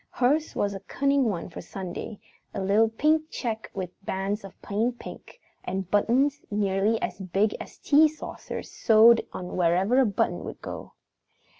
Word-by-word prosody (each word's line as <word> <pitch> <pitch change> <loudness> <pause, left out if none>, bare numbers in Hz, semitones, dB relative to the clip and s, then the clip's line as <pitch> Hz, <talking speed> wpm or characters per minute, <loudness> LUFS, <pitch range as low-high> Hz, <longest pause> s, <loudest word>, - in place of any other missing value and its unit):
Hers 290 +5 +1
was 200 0 0
a 195 - -5
cunning 275 +5 +1
one 195 -7 -2
for - - -7
Sunday, 190 +2 -7 0.4
a - - -2
little 205 +4 +3
pink 310 +7 +1
check 225 -7 -4
with 185 0 -6
bands 195 +2 -2
of 195 - -12
plain 220 +5 -1
pink, 245 - -11 0.2
and 190 0 -4
buttons 260 +7 +2
nearly 205 +1 +1
as 180 - -3
big 195 +3 0
as - - -10
tea 300 +2 +5
saucers 310 0 -7
sewed 230 +1 +6
on 180 -1 -6
wherever 185 +8 +3
a 265 - +5
button 200 - -1
would - - -7
go. - - -8
210 Hz, 160 wpm, -26 LUFS, 195-250 Hz, 0.4 s, sewed